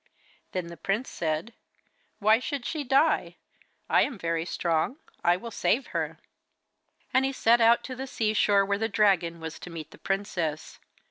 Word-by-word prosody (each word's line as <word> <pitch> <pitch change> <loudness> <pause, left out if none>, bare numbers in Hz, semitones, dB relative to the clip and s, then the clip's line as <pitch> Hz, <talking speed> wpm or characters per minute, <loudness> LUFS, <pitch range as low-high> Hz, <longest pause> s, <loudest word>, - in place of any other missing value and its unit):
Then 185 -2 -2
the 170 0 -9
prince 205 +6 -2
said: 160 +7 -2 0.6
'Why 215 +2 +4
should 270 -1 -4
she 310 -3 -2
die? 275 +4 +2 0.5
I - - +4
am 255 - -1
very 165 -2 -1
strong, 170 - 0 0.3
I 175 +1 +4
will 230 +4 -8
save 250 +4 +1
her.' - - -2 1.0
And 260 - +4
he 270 - +1
set 235 -2 +3
out 230 +1 +5
to 255 - -6
the 265 +2 -5
sea 220 -4 0
shore, 200 -2 +4
where 200 0 0
the 225 +1 0
dragon 180 -7 +2
was 160 0 -7
to - - -9
meet 160 -2 -8
the - - -15
princess. 185 -6 -3
205 Hz, 175 wpm, -27 LUFS, 170-240 Hz, 1.0 s, out